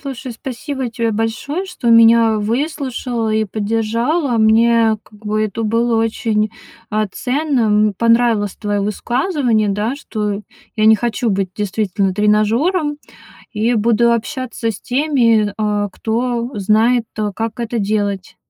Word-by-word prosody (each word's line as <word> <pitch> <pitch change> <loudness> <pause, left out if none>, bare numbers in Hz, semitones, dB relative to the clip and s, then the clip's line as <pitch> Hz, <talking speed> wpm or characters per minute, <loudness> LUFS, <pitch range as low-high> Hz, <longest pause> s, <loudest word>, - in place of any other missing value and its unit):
Слушай, 265 -3 -6
спасибо 260 +2 -5
тебе 230 -1 -1
большое, 225 - -2
что 360 -11 -2
меня 230 -1 +6
выслушала 245 0 -2
и 220 0 +1
поддержала. 230 - -1
Мне 225 0 +4
как 210 - -20
бы 215 0 -1
это 215 +2 -4
было 230 +2 +1
очень, 220 -1 0 0.4
а, 215 0 0
ценным. 235 -4 +1
Понравилось 230 -3 +2
твоё 205 -1 -2
высказывание, 240 - 0
да, 210 +5 -1
что 210 -7 -4 0.4
я 215 0 +3
не 220 - +7
хочу 240 +1 -1
быть 195 -2 -1
действительно 200 -2 -1
тренажёром 230 - +1 0.6
и 225 +3 +1
буду 235 +2 +3
общаться 245 -1 -3
с 210 - -7
теми, 245 -6 +2
э, 210 -1 0
кто 235 +3 -2
знает, 220 +4 +2
э, 210 -1 -1
как 225 +2 -4
это 235 0 -3
делать. 200 -2 -2
225 Hz, 130 wpm, -17 LUFS, 210-245 Hz, 0.6 s, не